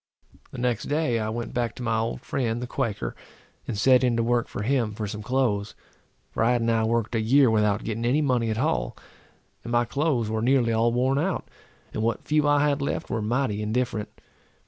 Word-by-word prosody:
The -, -, -10 dB
next 120 Hz, -2 st, -1 dB
day, 145 Hz, -6 st, 0 dB
I 110 Hz, 0 st, -2 dB
went 115 Hz, +1 st, -4 dB
back 120 Hz, -2 st, -1 dB
to 125 Hz, -, -7 dB
my 115 Hz, -2 st, +1 dB
old 115 Hz, +1 st, -2 dB
friend, 120 Hz, -4 st, -2 dB
the 125 Hz, -, -4 dB
Quaker, 110 Hz, -, -3 dB, 0.5 s
and 105 Hz, -, -3 dB
set 130 Hz, +4 st, +5 dB
in 120 Hz, -2 st, +2 dB
to 115 Hz, -, +2 dB
work 120 Hz, 0 st, +1 dB
for 100 Hz, -, -5 dB
him 120 Hz, -3 st, +1 dB
for 110 Hz, -, -3 dB
some 105 Hz, +1 st, -5 dB
clothes; 110 Hz, -3 st, 0 dB, 0.6 s
for -, -, 0 dB
I 120 Hz, +2 st, +4 dB
had 120 Hz, -1 st, +1 dB
now 115 Hz, -1 st, +2 dB
worked 115 Hz, 0 st, 0 dB
a 115 Hz, -, +1 dB
year 130 Hz, +2 st, +4 dB
without 105 Hz, -2 st, +2 dB
getting 115 Hz, +1 st, -3 dB
any 130 Hz, +5 st, +3 dB
money 125 Hz, -5 st, +1 dB
at 110 Hz, -, -1 dB
all, 65 Hz, -, -1 dB, 0.7 s
and 120 Hz, -, -6 dB
my 120 Hz, 0 st, +3 dB
clothes 135 Hz, -2 st, 0 dB
were 110 Hz, 0 st, -1 dB
nearly 120 Hz, -1 st, +3 dB
all 115 Hz, +1 st, +2 dB
worn 130 Hz, +3 st, +1 dB
out, 185 Hz, +4 st, -1 dB, 0.5 s
and 110 Hz, -, -2 dB
what 115 Hz, 0 st, -1 dB
few 150 Hz, -1 st, +2 dB
I 145 Hz, 0 st, +4 dB
had 145 Hz, 0 st, 0 dB
left 140 Hz, -, -3 dB
were 110 Hz, -, -1 dB
mighty 110 Hz, -1 st, 0 dB
indifferent. 110 Hz, 0 st, -1 dB
120 Hz, 215 wpm, -25 LUFS, 110-130 Hz, 0.7 s, set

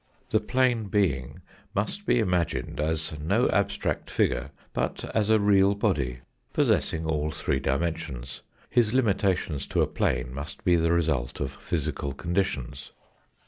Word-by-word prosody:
The -, -, +4 dB
plane 125 Hz, -3 st, +1 dB
being 85 Hz, -, 0 dB, 0.3 s
must 180 Hz, -, -2 dB
be -, -, +4 dB
imagined 90 Hz, -10 st, 0 dB
as 80 Hz, +1 st, -1 dB
no 100 Hz, +11 st, +2 dB
abstract 100 Hz, 0 st, 0 dB
figure, 65 Hz, +1 st, +1 dB, 0.2 s
but -, -, -2 dB
as 110 Hz, -1 st, +1 dB
a 110 Hz, 0 st, +5 dB
real 100 Hz, -1 st, +4 dB
body 70 Hz, -, 0 dB, 0.3 s
possessing 80 Hz, 0 st, +2 dB
all 75 Hz, -1 st, 0 dB
three 75 Hz, -3 st, -1 dB
63 -, -, -1 dB
dimensions. 70 Hz, -3 st, -2 dB, 0.3 s
His 115 Hz, -2 st, +2 dB
limitation 100 Hz, -, +1 dB
to -, -, -1 dB
a -, -, +1 dB
plane 60 Hz, 0 st, -1 dB
must 70 Hz, +3 st, -7 dB
be 90 Hz, -, +4 dB
the 85 Hz, 0 st, +2 dB
result 75 Hz, -8 st, 0 dB
of 70 Hz, -1 st, -2 dB
physical 75 Hz, -3 st, -3 dB
conditions. 75 Hz, -6 st, -2 dB
80 Hz, 140 wpm, -27 LUFS, 70-100 Hz, 0.3 s, a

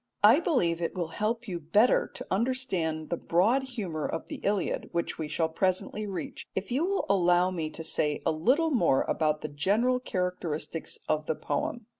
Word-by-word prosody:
I 225 Hz, +8 st, +8 dB
believe 175 Hz, -, +1 dB
it 170 Hz, -, -2 dB
will 175 Hz, -3 st, -2 dB
help 225 Hz, +6 st, -2 dB
you 175 Hz, -3 st, -3 dB
better 205 Hz, +10 st, +3 dB
to -, -, -6 dB
understand 190 Hz, -9 st, -1 dB
the 170 Hz, -, 0 dB
broad 205 Hz, +13 st, +2 dB
humour 205 Hz, -, -4 dB
of 165 Hz, -, -5 dB
the -, -, -5 dB
Iliad, 200 Hz, -2 st, -1 dB
which 170 Hz, -1 st, -2 dB
we 155 Hz, -, -2 dB
shall 160 Hz, +2 st, 0 dB
presently 185 Hz, +5 st, -1 dB
reach, 195 Hz, -2 st, -6 dB
if 190 Hz, +2 st, -3 dB
you 270 Hz, +6 st, +1 dB
will 395 Hz, 0 st, 0 dB
allow 180 Hz, -1 st, +3 dB
me 165 Hz, -4 st, -3 dB
to 160 Hz, -, -7 dB
say 150 Hz, -2 st, 0 dB
a -, -, +3 dB
little 260 Hz, -, +2 dB
more 170 Hz, -, +3 dB
about 155 Hz, -1 st, 0 dB
the -, -, -3 dB
general 205 Hz, -, +1 dB
characteristics 180 Hz, -7 st, -3 dB
of 155 Hz, 0 st, 0 dB
the 160 Hz, -, 0 dB
poem. 210 Hz, +12 st, -3 dB
180 Hz, 185 wpm, -28 LUFS, 160-230 Hz, -, I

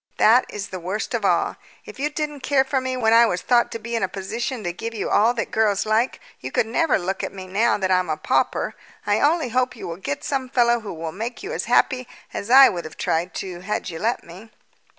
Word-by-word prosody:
That 235 Hz, +4 st, +5 dB
is 205 Hz, -1 st, -6 dB
the 185 Hz, -, -6 dB
worst 195 Hz, +8 st, -4 dB
of 230 Hz, -3 st, -1 dB
all. 195 Hz, -, +1 dB, 0.3 s
If -, -, -11 dB
you 295 Hz, +2 st, 0 dB
didn't 295 Hz, -1 st, -4 dB
care 270 Hz, 0 st, +2 dB
for 265 Hz, 0 st, -1 dB
me 255 Hz, 0 st, -2 dB
when 225 Hz, -2 st, +3 dB
I 230 Hz, 0 st, +7 dB
was 180 Hz, -4 st, -2 dB
thought 240 Hz, -1 st, +3 dB
to -, -, -3 dB
be 235 Hz, +1 st, -5 dB
in 230 Hz, -, 0 dB
a 190 Hz, -, +1 dB
position 225 Hz, +6 st, -4 dB
to 175 Hz, -1 st, -2 dB
give 225 Hz, +6 st, -6 dB
you 210 Hz, -, -3 dB
all 230 Hz, +4 st, +4 dB
that 230 Hz, -, -3 dB
girls 215 Hz, -2 st, +2 dB
like, 220 Hz, +4 st, +1 dB, 0.2 s
you -, -, -6 dB
could -, -, +2 dB
never 275 Hz, +6 st, +2 dB
look 190 Hz, +1 st, -3 dB
at -, -, -3 dB
me 190 Hz, -1 st, -8 dB
now 210 Hz, +6 st, +2 dB
that 190 Hz, -2 st, -1 dB
I'm 185 Hz, 0 st, +2 dB
a -, -, -1 dB
pauper. -, -, 0 dB, 0.3 s
I -, -, +2 dB
only 310 Hz, -2 st, +2 dB
hope 250 Hz, +2 st, 0 dB
you -, -, -7 dB
will 165 Hz, -1 st, -5 dB
get 180 Hz, -6 st, -4 dB
some 265 Hz, -2 st, -2 dB
fellow 240 Hz, -2 st, +3 dB
who 215 Hz, -3 st, -7 dB
will 160 Hz, -1 st, -5 dB
make 230 Hz, -, -6 dB
you 420 Hz, +5 st, -5 dB
as -, -, -3 dB
happy 255 Hz, -2 st, +2 dB, 0.3 s
as 200 Hz, -, -5 dB
I 270 Hz, +2 st, +9 dB
would 175 Hz, -5 st, -3 dB
have 155 Hz, -, -10 dB
tried 165 Hz, +2 st, -1 dB
to 180 Hz, -2 st, -7 dB
had 190 Hz, 0 st, -3 dB
you 165 Hz, -, -6 dB
let 230 Hz, +6 st, -1 dB
me." 185 Hz, +7 st, -13 dB
225 Hz, 250 wpm, -23 LUFS, 190-255 Hz, 0.3 s, I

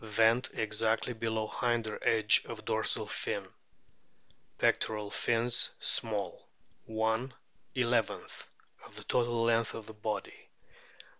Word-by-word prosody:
Vent 115 Hz, +3 st, +3 dB
exactly 110 Hz, +2 st, 0 dB
below 110 Hz, -1 st, -1 dB
hinder 115 Hz, -2 st, -1 dB
edge 110 Hz, -2 st, +5 dB
of -, -, -8 dB
dorsal -, -, 0 dB
fin. -, -, -3 dB, 1.1 s
Pectoral 105 Hz, -2 st, +1 dB
fins 115 Hz, +1 st, +1 dB
small, 105 Hz, -5 st, 0 dB, 0.4 s
^ 110 Hz, +3 st, 0 dB, 1.5 s
of -, -, -10 dB
total 120 Hz, -1 st, +1 dB
length 115 Hz, -1 st, +2 dB
of 110 Hz, -1 st, -10 dB
body. 105 Hz, -1 st, -4 dB
110 Hz, 90 wpm, -32 LUFS, 110-115 Hz, 1.5 s, edge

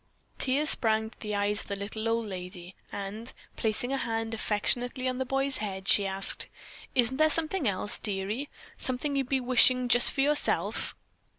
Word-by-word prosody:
Tears 280 Hz, +3 st, +2 dB
sprang 220 Hz, -1 st, +3 dB
to -, -, -20 dB
the 210 Hz, -1 st, -3 dB
eyes 205 Hz, 0 st, 0 dB
of -, -, -12 dB
the 200 Hz, -, -3 dB
little 215 Hz, +3 st, -3 dB
old 230 Hz, 0 st, 0 dB
lady, 180 Hz, -2 st, -7 dB, 0.2 s
and 205 Hz, +4 st, -5 dB, 0.2 s
placing 230 Hz, +3 st, -1 dB
a -, -, +1 dB
hand 225 Hz, -2 st, -2 dB
affectionately 245 Hz, +4 st, 0 dB
on 255 Hz, 0 st, -2 dB
the 260 Hz, -, 0 dB
boy's 270 Hz, +1 st, +1 dB
head 195 Hz, -2 st, -5 dB
she 200 Hz, -1 st, +4 dB
asked: 195 Hz, 0 st, +1 dB, 0.5 s
"Isn't 255 Hz, 0 st, +2 dB
there 310 Hz, +1 st, +5 dB
something 320 Hz, 0 st, -1 dB
else, 200 Hz, +1 st, 0 dB
dearie, 210 Hz, +7 st, -2 dB, 0.3 s
something 270 Hz, +3 st, -1 dB
you'd 270 Hz, -2 st, -1 dB
be 270 Hz, -, +2 dB
wishing 255 Hz, 0 st, +4 dB
just 240 Hz, 0 st, +5 dB
for 270 Hz, -, 0 dB
yourself?" 295 Hz, +1 st, +1 dB
230 Hz, 175 wpm, -29 LUFS, 205-260 Hz, 0.5 s, there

